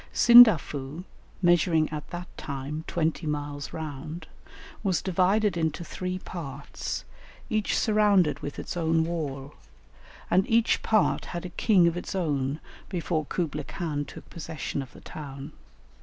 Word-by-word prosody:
Sindafu, 170 Hz, -, +6 dB, 0.4 s
measuring 170 Hz, -2 st, +4 dB
at 150 Hz, -1 st, -6 dB
that 175 Hz, 0 st, -6 dB
time 140 Hz, +2 st, -5 dB
twenty 160 Hz, -1 st, -1 dB
miles 145 Hz, -1 st, -4 dB
round, 155 Hz, +1 st, -6 dB, 0.6 s
was 190 Hz, -5 st, +1 dB
divided 190 Hz, +2 st, +2 dB
into 160 Hz, 0 st, -1 dB
three 185 Hz, +2 st, -4 dB
parts, 170 Hz, -7 st, -6 dB, 0.5 s
each 215 Hz, -1 st, +1 dB
surrounded 205 Hz, -7 st, +3 dB
with 145 Hz, -, -6 dB
its -, -, -5 dB
own 165 Hz, -1 st, +2 dB
wall, 150 Hz, -4 st, -4 dB, 0.8 s
and 185 Hz, +2 st, +3 dB
each 230 Hz, 0 st, +3 dB
part 215 Hz, -2 st, +2 dB
had 175 Hz, 0 st, -5 dB
a -, -, -5 dB
king 180 Hz, -1 st, +4 dB
of 170 Hz, -, +1 dB
its 175 Hz, -, -5 dB
own 145 Hz, -5 st, -1 dB, 0.3 s
before 165 Hz, -4 st, -2 dB
Kublaï 150 Hz, -4 st, -3 dB
Khan 155 Hz, -5 st, -3 dB
took -, -, -11 dB
possession 160 Hz, -3 st, -4 dB
of 130 Hz, -, -9 dB
the -, -, -14 dB
town. 140 Hz, -1 st, -8 dB
165 Hz, 135 wpm, -27 LUFS, 150-180 Hz, 0.8 s, Sindafu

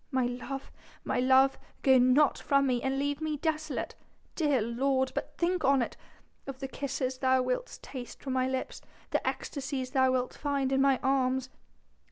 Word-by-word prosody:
My 260 Hz, -3 st, +1 dB
love... 250 Hz, +3 st, -5 dB, 0.3 s
my -, -, -1 dB
love, 265 Hz, +1 st, +4 dB, 0.2 s
go 265 Hz, -1 st, +6 dB
not 255 Hz, +4 st, +4 dB
from 275 Hz, -1 st, +2 dB
me, 250 Hz, -2 st, +1 dB
and 265 Hz, 0 st, -1 dB
leave 285 Hz, +2 st, -1 dB
me 310 Hz, -1 st, -1 dB
desolate.... 310 Hz, 0 st, -2 dB, 0.4 s
Dear 295 Hz, -5 st, +2 dB
lord, 260 Hz, +4 st, 0 dB
but -, -, -5 dB
think 355 Hz, 0 st, 0 dB
on 275 Hz, -2 st, +4 dB
it -, -, -6 dB, 0.5 s
of 275 Hz, -1 st, -5 dB
the 270 Hz, 0 st, -5 dB
kisses 265 Hz, -1 st, -3 dB
thou 260 Hz, -1 st, +3 dB
wilt 255 Hz, -, -2 dB
taste 250 Hz, -3 st, -8 dB
from 265 Hz, -, -3 dB
my 255 Hz, 0 st, +1 dB
lips 260 Hz, 0 st, -3 dB, 0.3 s
the -, -, +1 dB
ecstasies 265 Hz, -2 st, -3 dB
thou 260 Hz, -1 st, +3 dB
wilt 255 Hz, -1 st, -1 dB
find 280 Hz, -2 st, -1 dB
in 270 Hz, 0 st, +3 dB
my 275 Hz, -1 st, +4 dB
arms!... 260 Hz, -1 st, +1 dB
265 Hz, 175 wpm, -30 LUFS, 255-280 Hz, 0.5 s, go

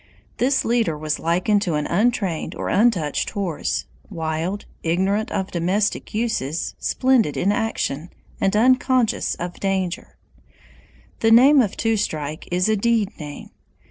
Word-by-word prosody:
This 265 Hz, +2 st, +2 dB
leader 230 Hz, -9 st, +1 dB
was 155 Hz, 0 st, -2 dB
likened 180 Hz, +5 st, +1 dB
to 175 Hz, -6 st, -1 dB
an 150 Hz, 0 st, -1 dB
untrained 195 Hz, -5 st, 0 dB
or -, -, -4 dB
untouched 190 Hz, -10 st, +1 dB
horse, 185 Hz, -7 st, -2 dB, 0.2 s
wild, 165 Hz, +2 st, -3 dB, 0.2 s
ignorant 190 Hz, +6 st, 0 dB
of 190 Hz, 0 st, -2 dB
domestic 185 Hz, +5 st, -1 dB
uses, 215 Hz, -, -2 dB
splendid 255 Hz, -, +2 dB
in 200 Hz, -, +2 dB
action, 205 Hz, -, -2 dB, 0.3 s
and 195 Hz, +1 st, +1 dB
unconscious 255 Hz, +1 st, +2 dB
of 175 Hz, 0 st, -6 dB
danger. 190 Hz, -2 st, -2 dB, 1.0 s
The 225 Hz, -, +3 dB
name 265 Hz, +5 st, +7 dB
of 205 Hz, -5 st, -2 dB
Two 225 Hz, -1 st, +1 dB
Strike 155 Hz, -6 st, -3 dB
is 180 Hz, +2 st, +1 dB
a 220 Hz, -, +3 dB
deed 220 Hz, -1 st, 0 dB
name. 150 Hz, -2 st, -8 dB
195 Hz, 135 wpm, -22 LUFS, 165-225 Hz, 1.0 s, name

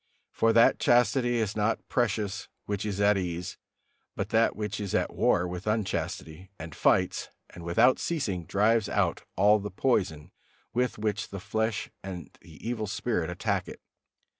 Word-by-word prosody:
For 115 Hz, -, +2 dB
that 115 Hz, -, +5 dB
chastity 120 Hz, 0 st, +3 dB
is 110 Hz, -3 st, -1 dB
not 105 Hz, +1 st, 0 dB
precious 105 Hz, -4 st, -1 dB, 0.2 s
which 105 Hz, +1 st, -2 dB
is 100 Hz, -1 st, -3 dB
at 100 Hz, -1 st, +4 dB
ease, 90 Hz, -1 st, -4 dB, 0.6 s
but -, -, -3 dB
that 115 Hz, +1 st, +3 dB
which 105 Hz, 0 st, -3 dB
is 100 Hz, -3 st, -3 dB
at -, -, 0 dB
war 90 Hz, -, +2 dB
with 90 Hz, +3 st, -6 dB
unchastity, 95 Hz, -5 st, -2 dB
and 80 Hz, -3 st, -8 dB
fights, -, -, +1 dB, 0.2 s
and 85 Hz, -, -10 dB
without 115 Hz, +10 st, +4 dB
ceasing 100 Hz, -, -2 dB
drives 110 Hz, +2 st, +2 dB
out -, -, +1 dB
all 105 Hz, +3 st, +5 dB
the 105 Hz, +1 st, -5 dB
poison 90 Hz, -, 0 dB, 0.4 s
with 125 Hz, 0 st, 0 dB
which 105 Hz, 0 st, -2 dB
the 100 Hz, -, -6 dB
flesh 110 Hz, +2 st, -2 dB
and 90 Hz, -4 st, -8 dB
the 80 Hz, +6 st, -11 dB
evil 115 Hz, -3 st, -2 dB
spirit 100 Hz, -4 st, -1 dB
attack 95 Hz, +1 st, -1 dB
it. -, -, -9 dB
105 Hz, 160 wpm, -28 LUFS, 90-115 Hz, 0.6 s, that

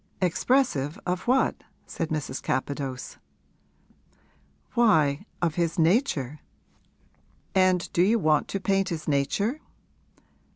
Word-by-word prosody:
'Expressive 180 Hz, -, +1 dB
of 180 Hz, +3 st, -2 dB
what?' 260 Hz, +2 st, +2 dB, 0.2 s
said 165 Hz, -, -4 dB
Mrs. 150 Hz, -4 st, -3 dB
Capadose. 135 Hz, -1 st, -3 dB, 1.5 s
'Why, 200 Hz, -, +3 dB, 0.2 s
of 165 Hz, -3 st, +1 dB
his 165 Hz, +2 st, -1 dB
nature.' 160 Hz, -, +1 dB, 1.1 s
'And 185 Hz, -2 st, +3 dB
do 170 Hz, -, +3 dB
you 210 Hz, +6 st, +4 dB
want 155 Hz, -7 st, +2 dB
to 195 Hz, -, -3 dB
paint 195 Hz, 0 st, +1 dB
his 160 Hz, -3 st, -5 dB
nature?' 200 Hz, -, 0 dB
170 Hz, 100 wpm, -26 LUFS, 145-200 Hz, 1.5 s, you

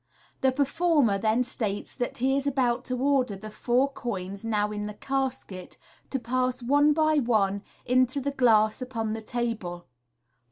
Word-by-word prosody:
The 265 Hz, -, +3 dB
performer 280 Hz, -, +2 dB
then 220 Hz, +4 st, +2 dB
states 215 Hz, -5 st, -3 dB
that 245 Hz, -2 st, -3 dB
he 265 Hz, +2 st, +2 dB
is 275 Hz, 0 st, -1 dB
about 255 Hz, -2 st, +1 dB
to 255 Hz, -, -2 dB
order 260 Hz, -5 st, +1 dB
the 215 Hz, +2 st, -9 dB
four 245 Hz, +5 st, +1 dB
coins 200 Hz, -7 st, -5 dB
now 210 Hz, -2 st, 0 dB
in 210 Hz, 0 st, -4 dB
the 210 Hz, -, -7 dB
casket 260 Hz, -9 st, -4 dB, 0.3 s
to 270 Hz, -, -1 dB
pass 255 Hz, +1 st, -1 dB
one 290 Hz, +4 st, +4 dB
by 310 Hz, 0 st, +3 dB
one 205 Hz, -6 st, +1 dB, 0.2 s
into 255 Hz, +2 st, +2 dB
the 280 Hz, +1 st, -2 dB
glass 220 Hz, -4 st, +3 dB
upon 230 Hz, -4 st, -3 dB
the 220 Hz, -, -4 dB
table. 215 Hz, -7 st, -3 dB
245 Hz, 160 wpm, -27 LUFS, 215-270 Hz, 0.3 s, one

